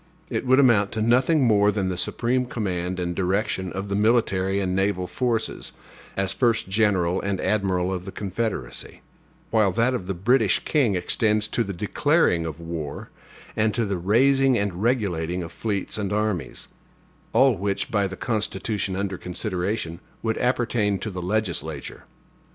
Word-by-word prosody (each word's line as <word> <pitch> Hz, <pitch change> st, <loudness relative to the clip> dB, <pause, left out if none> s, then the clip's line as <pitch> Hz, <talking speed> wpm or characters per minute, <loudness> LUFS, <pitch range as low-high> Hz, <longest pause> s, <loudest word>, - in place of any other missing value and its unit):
It -, -, -2 dB
would 130 Hz, +2 st, +5 dB
amount 110 Hz, -7 st, +4 dB
to 110 Hz, -, -2 dB
nothing 130 Hz, +6 st, +3 dB
more 105 Hz, -2 st, +4 dB
than 100 Hz, -2 st, -1 dB
the 90 Hz, -, -2 dB
supreme 125 Hz, +7 st, 0 dB
command 90 Hz, -6 st, -3 dB
and 90 Hz, -1 st, -2 dB
direction 95 Hz, 0 st, -1 dB
of 95 Hz, +2 st, -4 dB
the 100 Hz, -, -2 dB
military 100 Hz, -3 st, +2 dB
and 95 Hz, -2 st, -1 dB
naval 95 Hz, -1 st, 0 dB
forces, 120 Hz, +3 st, -2 dB, 0.4 s
as 95 Hz, 0 st, 0 dB
first 115 Hz, -5 st, +1 dB
General 95 Hz, -3 st, +2 dB
and 100 Hz, -1 st, -2 dB
admiral 95 Hz, -3 st, 0 dB
of 90 Hz, -1 st, -5 dB
the 95 Hz, -, -6 dB
Confederacy; 100 Hz, -, -4 dB, 0.5 s
while 110 Hz, -4 st, +3 dB
that 115 Hz, +6 st, +2 dB
of 95 Hz, -8 st, -3 dB
the 95 Hz, -, -2 dB
British 110 Hz, +3 st, +3 dB
king 130 Hz, -10 st, +2 dB
extends 105 Hz, +3 st, +1 dB
to 120 Hz, -, +1 dB
the 100 Hz, -, -5 dB
declaring 105 Hz, -, +1 dB
of 80 Hz, 0 st, -6 dB
war 80 Hz, -3 st, -6 dB, 0.4 s
and 110 Hz, -1 st, +1 dB
to 120 Hz, -2 st, +1 dB
the 100 Hz, -1 st, -1 dB
raising 130 Hz, +7 st, +3 dB
and 100 Hz, -3 st, -2 dB
regulating 90 Hz, -8 st, 0 dB
of 85 Hz, -, -8 dB
fleets 100 Hz, +3 st, -3 dB
and 100 Hz, -1 st, -2 dB
armies 105 Hz, -9 st, -2 dB, 0.6 s
all 130 Hz, +2 st, +5 dB
which, 100 Hz, 0 st, -2 dB
by 100 Hz, -2 st, +2 dB
the 95 Hz, -1 st, -8 dB
Constitution 105 Hz, -3 st, -2 dB
under 95 Hz, -1 st, -3 dB
consideration, 90 Hz, -1 st, -3 dB, 0.2 s
would 110 Hz, -1 st, -1 dB
appertain 120 Hz, -5 st, +1 dB
to 110 Hz, -, -5 dB
the 90 Hz, -1 st, -5 dB
legislature. 90 Hz, -6 st, -3 dB
100 Hz, 160 wpm, -24 LUFS, 90-115 Hz, 0.6 s, would